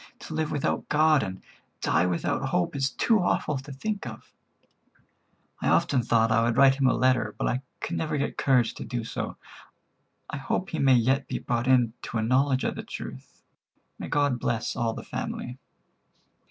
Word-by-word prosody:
To -, -, -8 dB
live 155 Hz, -1 st, -1 dB
without 145 Hz, -, -1 dB
God 155 Hz, -1 st, +4 dB
and 95 Hz, -2 st, -5 dB, 0.4 s
die 90 Hz, -, +2 dB
without 90 Hz, -2 st, -1 dB
hope 90 Hz, +7 st, 0 dB
is 135 Hz, -1 st, +1 dB
too 220 Hz, -, +2 dB
awful 150 Hz, -5 st, 0 dB
to 140 Hz, +2 st, -10 dB
think 200 Hz, -, -4 dB
of. 110 Hz, -2 st, -10 dB, 1.3 s
I -, -, -1 dB
often 130 Hz, -, +3 dB
thought 115 Hz, -1 st, +2 dB
I 115 Hz, +1 st, +4 dB
would 115 Hz, +1 st, +1 dB
write 135 Hz, -1 st, +7 dB
him 135 Hz, -1 st, +1 dB
a -, -, +3 dB
letter, 125 Hz, -5 st, +2 dB
but -, -, -1 dB
I 125 Hz, -, 0 dB, 0.2 s
could 170 Hz, -, -3 dB
never 155 Hz, -2 st, -1 dB
get 140 Hz, -, -2 dB
courage 125 Hz, -4 st, +2 dB
to -, -, -7 dB
do 120 Hz, -3 st, -4 dB
so. 115 Hz, -, -5 dB, 0.9 s
I -, -, -5 dB
hope 180 Hz, +7 st, -2 dB
he 160 Hz, -, -2 dB
may 135 Hz, -2 st, +5 dB
yet 130 Hz, +4 st, +2 dB
be -, -, -2 dB
brought 120 Hz, +1 st, -2 dB
into 120 Hz, -2 st, +1 dB
a 110 Hz, -, 0 dB
knowledge 130 Hz, +3 st, +2 dB
of -, -, 0 dB
the -, -, -6 dB
truth. 65 Hz, -, -9 dB, 0.6 s
May -, -, -5 dB
God 145 Hz, -4 st, +1 dB
bless 115 Hz, -1 st, -1 dB
all 115 Hz, -1 st, 0 dB
the -, -, -7 dB
family." 125 Hz, +1 st, -5 dB
130 Hz, 185 wpm, -27 LUFS, 115-140 Hz, 1.3 s, write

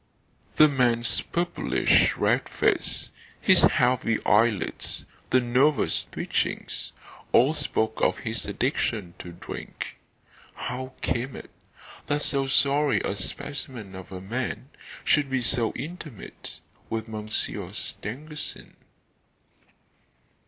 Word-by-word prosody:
The 155 Hz, -, +8 dB
man's 120 Hz, -4 st, +4 dB
purplish 175 Hz, 0 st, +2 dB
red -, -, +2 dB
face, -, -, 0 dB, 0.3 s
his -, -, +6 dB
heavy 125 Hz, -2 st, +3 dB
eyelids, 105 Hz, -4 st, +1 dB, 0.2 s
the 130 Hz, -, +5 dB
nervous 130 Hz, +5 st, +3 dB
twitchings, -, -, -2 dB, 0.4 s
all 135 Hz, +6 st, +5 dB
spoke 110 Hz, -7 st, -1 dB
of -, -, +3 dB
his 115 Hz, -4 st, -3 dB
addiction 105 Hz, -, -1 dB
to 90 Hz, -, -8 dB
drink. -, -, -7 dB, 0.6 s
How 130 Hz, +1 st, -5 dB
came 125 Hz, +2 st, -1 dB
it -, -, -10 dB, 0.6 s
that 145 Hz, 0 st, 0 dB
so 135 Hz, -1 st, 0 dB
sorry 140 Hz, +1 st, +3 dB
a -, -, -2 dB
specimen 115 Hz, 0 st, -5 dB
of 95 Hz, 0 st, -10 dB
a 90 Hz, -1 st, -6 dB
man 125 Hz, +5 st, -4 dB, 0.3 s
should 145 Hz, -2 st, +3 dB
be 130 Hz, -2 st, 0 dB
so 115 Hz, -2 st, +1 dB
intimate 155 Hz, -, -8 dB, 0.3 s
with 115 Hz, 0 st, -3 dB
Monsieur 110 Hz, 0 st, -2 dB
Stangerson? 150 Hz, +8 st, -5 dB
125 Hz, 105 wpm, -26 LUFS, 110-140 Hz, 0.6 s, The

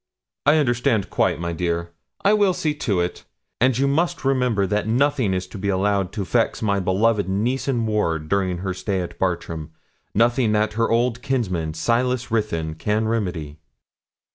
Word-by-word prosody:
'I 150 Hz, +2 st, +6 dB
understand 120 Hz, -7 st, +1 dB
quite, -, -, +1 dB
my 85 Hz, 0 st, -3 dB
dear. 85 Hz, 0 st, -2 dB, 0.3 s
I 200 Hz, -, +6 dB
will 200 Hz, -4 st, +3 dB
see 155 Hz, -2 st, 0 dB
to 105 Hz, -10 st, -1 dB
it; 90 Hz, 0 st, -3 dB, 0.4 s
and 130 Hz, 0 st, +3 dB
you 135 Hz, +1 st, +2 dB
must 165 Hz, +2 st, 0 dB
remember 125 Hz, -7 st, +2 dB
that 105 Hz, +2 st, -1 dB
nothing 125 Hz, -2 st, +2 dB
is 90 Hz, -1 st, -1 dB
to 105 Hz, -, -8 dB
be 100 Hz, +1 st, -1 dB
allowed 100 Hz, 0 st, +1 dB
to 100 Hz, -4 st, -3 dB
vex 90 Hz, -, 0 dB
my 100 Hz, -2 st, +1 dB
beloved 100 Hz, +2 st, +1 dB
niece 115 Hz, +9 st, -1 dB
and 120 Hz, -4 st, 0 dB
ward 85 Hz, -8 st, 0 dB
during 95 Hz, 0 st, 0 dB
her 95 Hz, -, -1 dB
stay 95 Hz, +1 st, -2 dB
at 85 Hz, -1 st, -7 dB
Bartram 85 Hz, -4 st, -2 dB, 0.5 s
nothing 115 Hz, +1 st, +3 dB
that 105 Hz, 0 st, +1 dB
her 115 Hz, +1 st, +1 dB
old 120 Hz, +1 st, +1 dB
kinsman, 90 Hz, -, -1 dB
Silas 125 Hz, +5 st, 0 dB
Ruthyn, 85 Hz, -8 st, -1 dB
can 105 Hz, +6 st, -1 dB
remedy.' 90 Hz, -9 st, -3 dB
105 Hz, 170 wpm, -22 LUFS, 90-125 Hz, 0.5 s, I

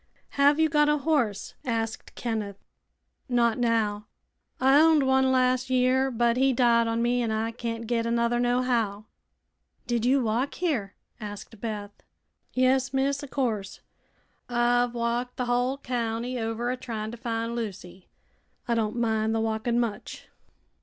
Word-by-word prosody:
"Have 285 Hz, +2 st, +3 dB
you 320 Hz, -, +5 dB
got 295 Hz, 0 st, +3 dB
a 300 Hz, -, +3 dB
horse?" 265 Hz, -10 st, 0 dB
asked 225 Hz, -2 st, -3 dB
Kenneth. 215 Hz, -4 st, -3 dB, 0.7 s
"Not 235 Hz, -1 st, +2 dB
now. 215 Hz, -3 st, 0 dB, 0.5 s
I 270 Hz, +2 st, +5 dB
owned 315 Hz, -3 st, +5 dB
one 265 Hz, 0 st, +3 dB
las' 255 Hz, 0 st, +2 dB
year, 260 Hz, +1 st, +2 dB
but 235 Hz, -1 st, +1 dB
he 265 Hz, +1 st, +3 dB
died 235 Hz, -2 st, +3 dB
on 230 Hz, +1 st, 0 dB
me 245 Hz, +1 st, +1 dB
an' 230 Hz, -, -1 dB
I 220 Hz, +1 st, -1 dB
can't 230 Hz, 0 st, -5 dB
get 230 Hz, 0 st, 0 dB
another 235 Hz, +1 st, +1 dB
nohow." 240 Hz, -4 st, 0 dB, 0.8 s
"Did 240 Hz, -2 st, -1 dB
you 260 Hz, +2 st, +3 dB
walk 235 Hz, +5 st, -1 dB
here?" 255 Hz, -, -2 dB, 0.2 s
asked 210 Hz, 0 st, -9 dB
Beth. 210 Hz, -3 st, -4 dB, 0.6 s
"Yes, 260 Hz, +1 st, +2 dB
miss; 275 Hz, +2 st, 0 dB
o' -, -, -6 dB
course. 225 Hz, -8 st, -2 dB, 0.7 s
I've 245 Hz, 0 st, +2 dB
walked 240 Hz, +1 st, -2 dB
the 250 Hz, -, -1 dB
hull 245 Hz, +2 st, 0 dB
county 245 Hz, -1 st, -3 dB
over 225 Hz, +2 st, -2 dB
a 255 Hz, -, -3 dB
tryin' 225 Hz, -4 st, -5 dB
to 240 Hz, -, -8 dB
find 230 Hz, 0 st, -3 dB
Lucy. 190 Hz, -5 st, -7 dB, 0.6 s
I 235 Hz, -, +1 dB
don' 225 Hz, 0 st, -1 dB
mind 220 Hz, -1 st, +1 dB
the -, -, +1 dB
walking 225 Hz, +2 st, 0 dB
much." 230 Hz, -4 st, -4 dB
240 Hz, 150 wpm, -26 LUFS, 225-255 Hz, 0.8 s, you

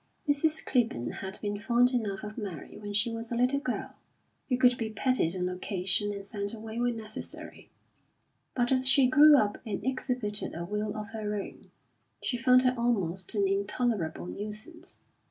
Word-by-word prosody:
Mrs. 305 Hz, +2 st, +1 dB
Clibborn 230 Hz, -, 0 dB
had 190 Hz, 0 st, -5 dB
been 205 Hz, 0 st, -2 dB
fond 240 Hz, +3 st, +3 dB
enough 215 Hz, -6 st, -2 dB
of 210 Hz, 0 st, -6 dB
Mary 195 Hz, -9 st, -6 dB
when 205 Hz, -1 st, -7 dB
she 210 Hz, +3 st, +1 dB
was 230 Hz, 0 st, -5 dB
a -, -, 0 dB
little 250 Hz, +4 st, +2 dB
girl, 255 Hz, -3 st, -3 dB, 0.6 s
who 250 Hz, -, +2 dB
could 250 Hz, -1 st, +5 dB
be 225 Hz, -2 st, -3 dB
petted 220 Hz, -5 st, +1 dB
on 180 Hz, -1 st, -1 dB
occasion 190 Hz, +2 st, 0 dB
and 200 Hz, -1 st, -6 dB
sent 200 Hz, +1 st, -4 dB
away 220 Hz, +1 st, -6 dB
when 240 Hz, -1 st, 0 dB
necessary; 215 Hz, -1 st, -7 dB, 0.9 s
but 245 Hz, 0 st, +1 dB
as 260 Hz, 0 st, +3 dB
she 270 Hz, 0 st, +6 dB
grew 295 Hz, +3 st, +8 dB
up 205 Hz, -4 st, +1 dB
and 215 Hz, -3 st, -4 dB
exhibited 250 Hz, -7 st, -2 dB
a 170 Hz, +1 st, -4 dB
will 210 Hz, +3 st, -3 dB
of 215 Hz, 0 st, -5 dB
her 215 Hz, -2 st, -3 dB
own, 200 Hz, -, -7 dB, 0.5 s
she 250 Hz, -, -2 dB
found 255 Hz, +1 st, +5 dB
her 255 Hz, 0 st, +3 dB
almost 195 Hz, -7 st, 0 dB
an 200 Hz, -1 st, +3 dB
intolerable 200 Hz, -3 st, -1 dB
nuisance. 215 Hz, -, -7 dB
220 Hz, 175 wpm, -29 LUFS, 200-250 Hz, 0.9 s, grew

